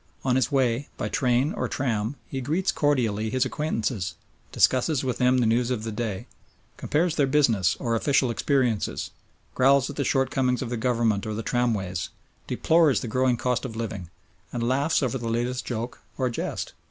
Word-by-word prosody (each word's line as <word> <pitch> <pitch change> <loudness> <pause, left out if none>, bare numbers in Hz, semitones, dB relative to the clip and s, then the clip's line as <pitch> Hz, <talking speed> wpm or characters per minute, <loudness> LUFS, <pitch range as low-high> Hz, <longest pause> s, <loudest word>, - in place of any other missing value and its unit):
On 125 -1 +2
his 130 -1 +1
way 130 -1 +1
by - - -2
train 125 +3 +1
or - - -2
tram 115 -1 -1
he 135 - -5
greets 160 +9 0
cordially 115 -7 +1
his 130 +3 +1
acquaintances, 115 - -2 0.4
discusses 130 +2 +2
with 125 -3 -2
them 125 +1 +4
the 125 - +2
news 120 +2 +2
of 120 -4 -2
the 110 - -3
day, 105 -3 -3 0.5
compares 165 +2 0
their 140 - +3
business 120 - +3
or 115 -3 -1
official 130 +1 +2
experiences, 125 -3 0 0.4
growls 135 +1 +4
at - - -12
the 140 - +1
shortcomings 130 -1 +1
of 120 - -6
the - - 0
Government 115 -3 0
or 110 - -3
the 110 - -4
tramways, 105 -8 -1 0.4
deplores 160 -4 +3
the - - -4
growing 130 +1 +1
cost 125 0 0
of 120 -4 -5
living, 105 -6 -5 0.4
and 120 -1 -2
laughs 140 +5 +2
over 130 0 -1
the 115 -1 -3
latest 120 +2 -1
joke 120 0 -4 0.2
or 130 -2 0
jest. - - -4
125 Hz, 175 wpm, -25 LUFS, 115-135 Hz, 0.5 s, them